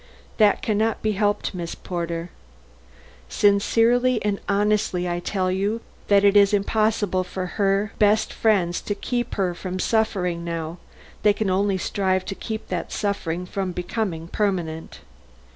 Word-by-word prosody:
That 210 -2 +4
can 210 -2 0
not 225 0 0
be 215 - +2
helped, 205 0 0
Miss 170 -2 -5
Porter. 170 -1 -4 1.0
Sincerely 230 +4 +3
and 205 -1 0
honestly 200 -3 +1
I 175 0 -1
tell 185 0 -1
you 200 +4 0 0.3
that 200 -1 +5
it 200 0 +5
is 205 0 +6
impossible 205 -2 +1
for 185 +1 -5
her 195 +3 0
best 210 0 +3
friends 185 -6 +1
to 205 - -3
keep 240 +3 -3
her 185 -3 0
from 185 +1 -5
suffering 185 -5 0
now; 170 0 -4 0.4
they 210 - +5
can 205 -2 -1
only 195 +1 +1
strive 185 0 0
to - - -4
keep 220 +2 -6
that 180 -2 -3
suffering 180 -4 -2
from 185 0 -3
becoming 180 -2 -3
permanent." 175 -5 -2
200 Hz, 145 wpm, -23 LUFS, 180-210 Hz, 1.0 s, is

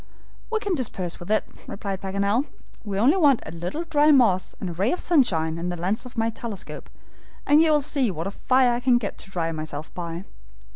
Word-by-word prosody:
"We 445 - 0
can 410 -3 -1
dispense 195 - -3
with 175 - -10
it," 215 - +3 0.2
replied 195 -2 -5
Paganel. 200 +7 0 0.4
"We 200 -3 -4
only 265 - +4
want 285 -8 +4
a - - -7
little 175 - -4
dry 300 -2 +3
moss 225 -11 +4
and 185 - -4
a - - -6
ray 195 +9 +1
of 360 - -1
sunshine, 165 - +2
and 175 +1 -2
the - - -3
lens 190 +8 -2
of 245 - -15
my 225 0 +1
telescope, 220 -3 -7 0.6
and 295 +2 +6
you'll 310 -2 +4
see 275 -3 +1
what 165 -3 -4
a 195 - -3
fire 250 +1 +2
I'll 250 -2 +5
get 220 -4 -4
to - - -9
dry 165 -3 -2
myself 155 -1 -6
by. 170 0 -5
210 Hz, 205 wpm, -24 LUFS, 175-265 Hz, 0.6 s, and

